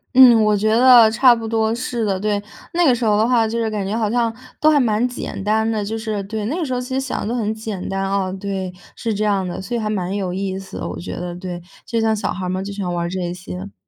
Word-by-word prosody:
嗯， 240 -4 +8
我 210 0 +3
觉 215 +2 +1
得 235 0 +7
差 245 +2 +5
不 230 -1 -4
多 220 0 +1
是 240 -1 -2
的， 195 -2 0
对。 205 0 0 0.3
那 350 0 +3
个 260 - +5
时 240 0 -2
候 210 -2 +3
的 220 +2 +3
话， 235 -3 +3
就 225 +2 -3
是 230 -1 0
感 205 -2 -2
觉 205 +3 -2
好 215 -2 0
像 235 -2 +1 0.3
都 310 - +6
还 300 -2 +4
蛮 230 -2 +2
简 245 -5 -6
单 220 +2 +1
的， 215 -2 -1
就 220 +2 -3
是 220 -2 -3
对， 215 +1 -4
那 280 +9 -2
个 355 - -2
时 265 - -4
候 250 - 0
其 250 +1 -5
实 265 - +1
想 265 - -3
得 235 - -1
都 - - -1
很 215 -3 -1
简 215 -4 -5
单 195 0 -1
哦， 195 -1 0
对， 190 -2 -3 0.2
是 230 - -3
这 210 +1 -1
样 200 -3 +1
的。 175 - -5
所 210 +6 -4
以 - - 0
还 215 -1 -2
蛮 190 -2 -2
有 190 -3 -2
意 190 0 -3
思 195 - -9
的， - - -4
我 - - -6
觉 175 - -6
得， 175 0 -5
对， 180 -1 -6 0.3
就 230 - 0
像 220 -1 +2
小 210 - -2
孩 185 0 -4
儿 - - -2
们 185 +1 -2
就 200 - -6
喜 200 -1 -4
欢 175 -1 -2
玩 170 0 -1
儿 - - -4
这 175 -1 -3
些。 95 - -8
215 Hz, 320 characters per minute, -20 LUFS, 195-230 Hz, 0.3 s, 嗯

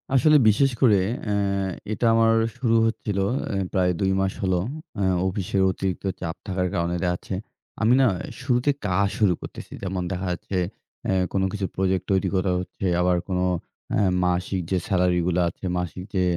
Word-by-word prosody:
আসলে 150 +3 +6
বিশেষ 135 +6 +3
করে 105 -7 +6 0.3
অ্যা 105 -2 0 0.6
এটা 110 - -1
আমার 115 0 +4 0.2
শুরু 120 -3 +2
হচ্ছিলো 105 -3 -1 0.2
অ্যা 100 - -2 0.2
প্রায় 90 -1 +3
২ 95 -1 +2
মাস 95 0 0
হলো। 95 -2 +2 0.4
অ্যা 100 - +1 0.2
অফিসের 95 0 -1
অতিরিক্ত 95 0 -3 0.2
চাপ 85 -1 -3
থাকার 90 -1 0
কারণে 85 +1 0
দেখা 90 - +2
যাচ্ছে 95 - -5 0.5
আমি 110 +3 +4
না - - +5 0.4
শুরুতে 125 +1 +1 0.2
কাজ 90 -2 +1 0.2
শুরু 100 -5 +4
করতেছি। - - -9
যেমন 95 -1 -2
দেখা 95 +1 -3
যাচ্ছে 95 +2 -4 0.5
অ্যা 95 - +1 0.2
কোনো 95 -1 +2
কিছুর 100 -3 -3
প্রজেক্ট 95 -1 +1
তৈরি 95 -1 +2
করা 95 0 +1
হচ্ছে। 90 +1 -6 0.2
আবার 90 0 +3
কোনো 90 -1 0 0.5
অ্যা - - +2 0.2
মাসিক 90 +2 0
যে 95 - +3
সেলারিগুলা 90 -2 +2
আছে 90 - -10
মাসিক 90 0 -4
যে 95 - +3
95 Hz, 170 wpm, -24 LUFS, 90-105 Hz, 0.6 s, আসলে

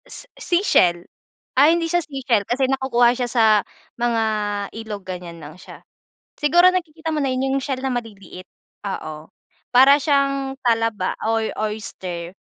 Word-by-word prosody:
Se - - -12
seashell. 180 - +2 0.5
Ay, 295 +5 +5
hindi 335 - -1
siya 350 0 +2
seashell 270 -7 -1
kasi 265 +2 +1
nakukuha 255 -2 +2
siya 245 -1 -3
sa 230 -2 +3 0.5
mga 235 -1 +1 0.5
ilog 215 -3 -7
ganiyan 180 -2 -7
lang 150 +2 -10
siya. - - -13 0.6
Siguro 345 +5 +5
nakikita 325 -3 -3
mo 305 - -1
na 275 - 0
yun 265 +1 0
yung - - -8
shell 265 -2 -3
na 265 -1 -1
maliliit, 200 -6 -7 0.4
oo. 155 -5 -6 0.4
Para 265 +3 +7
siyang 275 -2 0
talaba 225 -5 0
or 225 0 0 0.2
oyster, 180 -5 -7
245 Hz, 145 wpm, -21 LUFS, 205-275 Hz, 0.6 s, Para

